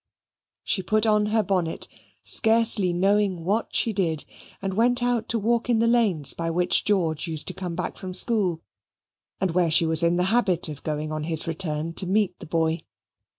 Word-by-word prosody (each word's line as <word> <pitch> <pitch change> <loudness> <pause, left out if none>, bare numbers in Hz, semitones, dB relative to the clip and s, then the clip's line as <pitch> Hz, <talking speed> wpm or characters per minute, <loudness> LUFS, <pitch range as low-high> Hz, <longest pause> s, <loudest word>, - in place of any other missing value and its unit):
She 190 - -1
put 215 +4 0
on 210 -1 +2
her 220 +1 +1
bonnet, 180 -4 -1 0.4
scarcely 225 -4 +4
knowing 195 0 0
what 205 +6 -2
she 225 - +1
did, 165 -6 -2 0.3
and 195 -1 -4
went 245 +4 +2
out 245 -2 -1
to 235 - +1
walk 235 +3 -1
in 235 - +3
the 230 - +2
lanes 210 - +3
by 165 0 -4
which 175 +2 +1
George 175 -6 0
used 160 -2 -5
to - - -6
come 180 -2 -6
back 180 - -5
from 185 -1 -7
school, 190 -6 +3 0.8
and 190 -2 -1
where 175 0 +1
she 165 +1 +3
was 160 0 +2
in 170 +1 +1
the 180 - +1
habit 185 -9 +1
of 145 -2 -8
going 155 0 -4
on 155 -1 -4
his 160 -1 0
return 165 -1 -2
to 185 - -1
meet 195 -1 0
the - - -10
boy. 160 0 -1
185 Hz, 195 wpm, -24 LUFS, 165-215 Hz, 0.8 s, scarcely